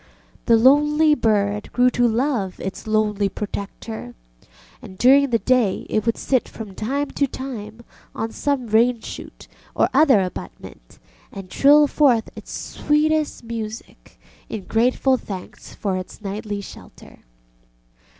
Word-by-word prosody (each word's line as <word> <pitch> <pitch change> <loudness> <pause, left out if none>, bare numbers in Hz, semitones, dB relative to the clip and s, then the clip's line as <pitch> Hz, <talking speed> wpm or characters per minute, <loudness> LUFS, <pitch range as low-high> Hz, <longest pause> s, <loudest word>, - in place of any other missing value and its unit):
The 230 -2 +6
lonely 295 +5 +4
bird 210 -5 0
grew 250 0 +4
to 245 -1 +2
love 230 -5 -1
its 190 +3 -6
lonely 210 -2 +1
protector, 200 - -7 0.7
and 185 - -12
during 275 +4 +5
the 235 - +2
day 240 -5 +1
it 215 +1 0
would 230 - +1
sit 260 -3 0
from 215 -4 -9
time 275 +9 -2
to 280 - 0
time 235 -4 -7 0.3
on 225 0 -3
some 280 -1 -1
rainshoot 230 +2 -1 0.3
or - - +2
other 275 -5 +5
abutment 180 - -7 0.3
and 195 -2 -9
trill 295 +2 +6
forth 265 -6 +2
its - - -10
sweetest 305 -1 0
music 225 -1 -8 0.3
in 215 -3 -5
grateful 250 +5 +2
thanks 190 -6 -9
for 195 -3 -2
its 185 - -8
nightly 205 0 -5
shelter. - - -13
230 Hz, 130 wpm, -21 LUFS, 210-270 Hz, 0.7 s, The